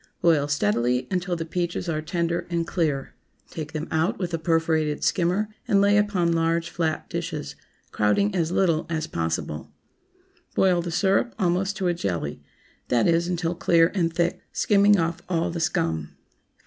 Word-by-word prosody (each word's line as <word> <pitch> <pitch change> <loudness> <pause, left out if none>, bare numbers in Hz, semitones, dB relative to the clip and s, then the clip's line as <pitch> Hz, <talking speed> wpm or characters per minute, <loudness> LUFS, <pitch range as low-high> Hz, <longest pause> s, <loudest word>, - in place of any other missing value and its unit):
Boil 155 -4 +3
steadily 125 -2 +1
until 180 -1 -1
the 165 -1 -4
peaches 175 +1 -2
are 155 -2 -1
tender 170 +1 -2
and 170 -1 -1
clear. 150 -7 -1 0.4
Take 155 -2 -6
them 155 +1 -3
out 165 +9 +1
with 180 -3 -4
a 165 - 0
perforated 160 -2 +1
skimmer 185 +4 +1 0.2
and 200 - +4
lay 200 +1 +4
upon 205 -5 +2
large 165 0 0
flat 160 -2 -2
dishes, - - -4 0.4
crowding 150 - +2
as 170 -3 0
little 170 -4 +1
as 160 -2 -1
possible. 80 - -3 0.8
Boil 180 -2 +3
the 170 - -5
syrup 195 +7 +1
almost 190 +1 0
to 190 -2 0
a 175 - +2
jelly—that 100 - -3
is, 170 0 +2
until 175 -1 -1
clear 165 -1 +3
and 170 -4 +1
thick, 170 +1 -1
skimming 205 -1 +4
off 165 0 -1
all 170 -2 0
the 170 - -4
scum. 80 - -1
170 Hz, 160 wpm, -25 LUFS, 155-180 Hz, 0.8 s, and